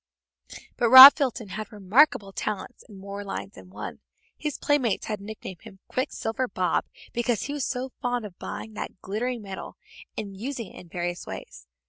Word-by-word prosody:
But 235 - +2
Rob 260 +3 +13
Fulton 245 -7 -2
had 215 +3 -6
remarkable 205 +1 +3
talents 210 +5 -5
in 205 - -12
more 200 +1 -7
lines 100 - -6
than 95 -1 -14
one. 105 +2 -8 0.4
His 300 -2 -4
playmates 275 -8 +1
had 210 -2 -4
nicknamed 200 -3 -9
him 215 -4 -13
"Quicksilver 255 -2 -2
Bob" 185 -4 0 0.3
because 240 -2 0
he 285 - -4
was 290 -3 -2
so 255 0 -3
fond 245 -2 -1
of 190 -4 -11
buying 220 - -7
that 200 - -7
glittering 230 +4 -3
metal 195 -1 -8 0.4
and 200 -2 -5
using 230 0 -6
it - - -11
in 175 - -14
various 175 +1 -4
ways. 60 +1 -9
215 Hz, 170 wpm, -26 LUFS, 190-250 Hz, 0.4 s, Rob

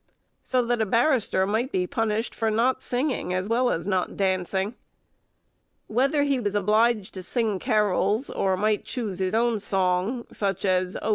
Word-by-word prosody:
So 250 -1 0
that 240 -1 0
a - - +2
barrister 230 -4 +2
might 225 +7 -1
be 180 -7 0
punished 225 +3 -1
for 225 -1 -1
not 240 +4 +1
singing, 250 -7 -1
as 185 +1 -2
well 245 +3 +2
as 165 - -2
not 190 -2 -1
dancing. 190 +1 0 1.1
Whether 275 +6 +1
he 280 -2 +1
was 205 -3 -2
obliged 215 +1 +2
to 185 - -6
sing 215 0 -1
carols, 210 +1 +1
or 190 -1 0
might 210 +1 +1
choose 210 -7 -4
his 190 +2 0
own 230 -1 +2
song, 195 +4 0
such 195 -1 -2
as, 185 -1 +1
"Oh! - - -1
215 Hz, 165 wpm, -25 LUFS, 190-240 Hz, 1.1 s, a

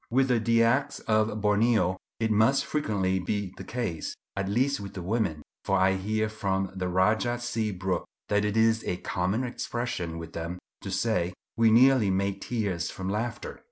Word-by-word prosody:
With 130 +2 +2
the 120 -2 +3
Dyaks 115 +3 +2
of 110 -2 +1
Borneo 105 -2 +3 0.2
it 110 -1 +1
must 130 +7 +3
frequently 100 -10 0
be 95 0 -2
the - - -7
case, 110 -11 -3 0.2
at 100 0 -2
least 130 +6 +1
with 100 0 -8
the 95 - -4
women, 90 -7 -1 0.2
for 95 - +2
I 95 0 +4
hear 110 +3 0
from 95 -3 -2
the 90 -1 -2
Rajah 110 +7 +2
C. 115 -3 -1
Brooke 95 -1 -2 0.2
that 105 0 +2
it 105 +1 0
is 110 0 +3
a 90 - -1
common 95 +7 -1
expression 120 -9 -3
with 80 0 -8
them 85 +2 -4 0.2
to - - -6
say 95 -6 0 0.2
"we 115 0 +4
nearly 125 -1 +5
made 100 +1 0
tears 100 -9 -2
from 95 0 -5
laughter." 110 +3 -3
105 Hz, 175 wpm, -28 LUFS, 95-115 Hz, 0.2 s, nearly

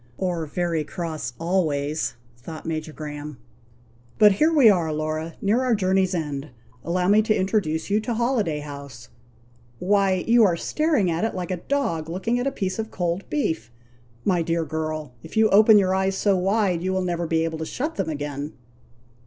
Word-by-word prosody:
"Or 175 -4 -2
very 165 0 -1
cross 155 -7 -5
always," 155 -5 0 0.2
thought 155 +7 -9
Major 155 -1 -3
Graham. 150 -2 -7 0.8
"But 210 -1 +7
here 305 +12 +3
we 290 -7 +6
are, 175 -6 +4
Laura, 155 +1 -3
near 215 +5 +2
our 255 -3 +2
journey's 190 -1 +1
end. 150 -3 -3 0.3
Allow 180 +1 0
me 210 +2 +5
to 215 0 +1
introduce 185 -4 0
you 210 - +3
to 225 +2 -3
Holiday 220 - 0
House! 140 -4 -9 0.7
Why, 190 +2 +2
you 235 0 +5
are 180 -5 +3
staring 295 - +1
at 165 +4 -1
it 225 - -1
like 180 -1 -4
a 185 - -1
dog 170 - -2
looking 190 +8 -1
at 250 - -1
a - - +1
piece 190 -6 -3
of 220 0 -3
cold 175 0 -3
beef! 160 - -1 0.6
My 180 -3 +2
dear 165 0 0
girl, 155 -2 -4
if - - -9
you 220 0 +5
open 215 +2 +7
your 190 -2 +3
eyes 190 0 +1
so 200 -1 +2
wide, 190 -1 +1
you 185 +1 -1
will 190 0 0
never 175 -1 -2
be 160 0 +1
able 160 -1 -3
to 160 - -3
shut 300 +5 -3
them 160 - -2
again!" 145 0 -4
180 Hz, 185 wpm, -24 LUFS, 155-205 Hz, 0.8 s, But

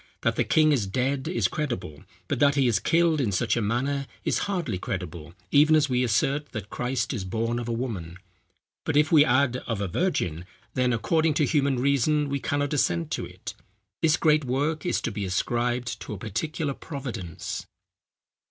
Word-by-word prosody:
That - - +2
the - - +2
king 155 -1 +4
is 120 -9 +1
dead, 130 +6 -1
is 115 -5 +1
credible; 120 - -4 0.3
but - - -1
that 145 -1 +4
he 135 -3 +3
is 110 -3 +2
killed 165 +4 +2
in 115 -6 0
such 110 +4 +1
a 115 - 0
manner 135 +6 -1 0.2
is - - +1
hardly 170 - -2
credible: 85 -3 -5 0.2
even 150 +2 +6
as 150 -2 +3
we 125 0 +2
assert 140 +5 0
that 110 -3 -6
Christ 125 +3 -1
is 110 -6 -3
born 115 +5 -1
of 120 - -5
a - - -1
woman; 105 -8 -4 0.7
but 155 -2 0
if 150 +3 +3
we 155 -3 +8
add 130 -2 +2
of 115 -4 -2
a 100 - -1
virgin; 90 - -1 0.3
then, 125 -1 +2
according 155 +6 +1
to 150 - +3
human 140 -3 +1
reason, 140 +3 +2
we 140 0 -1
cannot 145 +1 -1
assent 85 - +1
to - - -2
it. - - -8 0.5
This 160 +1 +4
great 155 -2 +3
work 145 +6 -1
is - - +1
to 120 - -2
be 105 -1 -4
ascribed 120 +6 -1
to - - -6
a - - -5
particular 140 - -3
providence." 125 - -6
130 Hz, 190 wpm, -26 LUFS, 110-145 Hz, 0.7 s, we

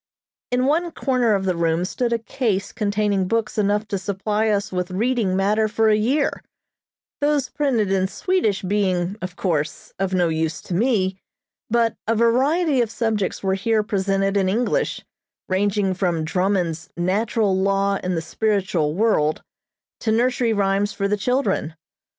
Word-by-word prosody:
In 250 +1 +1
one 330 +5 +1
corner 250 -8 +1
of 195 -1 -2
the 185 -2 +1
room 165 +1 +1
stood 240 +5 -2
a 235 - +2
case 215 -3 -2
containing 205 -3 0
books 225 0 -1
enough 205 +1 +1
to 200 - -1
supply 210 +3 -1
us 205 -1 0
with 180 0 -2
reading 215 0 0
matter 210 +3 +2
for 220 +1 +2
a 215 - +5
year, 260 +7 0 0.8
those 290 -2 +1
printed 240 -9 0
in 190 -1 +2
Swedish 220 - 0
being, 185 -1 0
of 185 -1 -5
course, 155 -6 -2
of 195 -1 0
no 175 -2 +3
use 160 0 -1
to - - -6
me, 190 -2 +1 0.5
but 230 0 +2
a 225 - +2
variety 265 +6 +2
of 230 - 0
subjects 220 -5 -2
were 190 0 +1
here 215 +3 +1
presented 195 -1 0
in 190 -1 +2
English, 245 - 0 0.4
ranging 195 0 +1
from 175 -4 -1
Drummond's 180 -1 -1
"Natural 200 +3 +1
Law 195 +1 +1
in 185 -1 -1
the 165 - -2
Spiritual 185 -5 0
World" 180 -8 +1 0.6
to 220 - -1
nursery 240 +1 +2
rhymes 200 0 +1
for 200 - -1
the 205 - +1
children. 215 - -1
205 Hz, 155 wpm, -22 LUFS, 185-230 Hz, 0.8 s, a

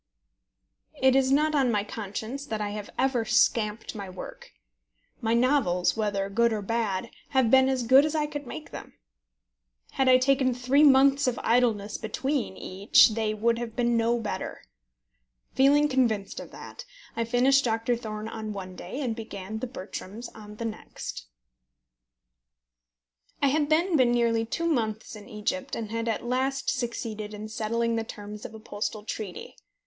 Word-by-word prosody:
It 265 0 +4
is 265 0 +3
not 305 +3 +3
on 270 -4 +3
my 205 -2 +1
conscience 220 +6 -5
that 220 -4 -3
I 205 -1 -2
have 210 -1 -6
ever 260 -3 +1
scamped 220 -1 +1
my 200 -3 -7
work. - - -9 0.7
My 225 0 +1
novels, 235 -8 +2
whether 205 -3 -1
good 235 +4 +2
or 215 -2 -2
bad, 225 -1 -2 0.3
have 245 -4 +4
been 265 0 +6
as 260 -2 0
good 260 +4 +6
as 305 +1 -1
I 305 -1 +1
could 290 -2 -6
make 155 -5 -8
them. - - -9 1.0
Had 265 -1 +2
I 255 - +8
taken 260 -1 +2
three 255 +4 +2
months 275 0 +5
of 245 - 0
idleness 225 -4 +1
between 250 -1 -2
each 195 +5 +4
they 215 -1 -1
would 230 +2 +1
have 230 -2 -5
been 240 -1 +1
no 230 +1 +2
better. 215 -2 -5 0.9
Feeling 285 +2 +5
convinced 235 -8 0
of - - -9
that, - - -10 0.3
I 230 - 0
finished 255 +4 +3
Doctor 230 +1 0
Thorne 215 -2 -6
on 220 -1 -5
one 185 -2 -7
day, 190 +11 -6
and 240 -5 -1
began 215 -2 -6
The 255 - -3
Bertrams 215 0 -7
on 210 -1 -11
the 230 - -5
next. - - -7 2.1
I 280 - +3
had 295 +1 +1
then 335 +3 +2
been 255 -4 +4
nearly 230 -1 +2
two 335 +8 -2
months 220 -10 -1
in 210 +2 -12
Egypt, 260 +6 -3
and 220 -2 -5
had 230 0 -2
at 225 +1 -2
last 265 +2 0
succeeded 225 -4 -4
in 215 +1 -7
settling 230 +1 -1
the 225 - -1
terms 210 -1 -9
of - - -8
a - - -9
postal 215 0 -4
treaty. 210 -3 -6
230 Hz, 165 wpm, -27 LUFS, 215-265 Hz, 2.1 s, I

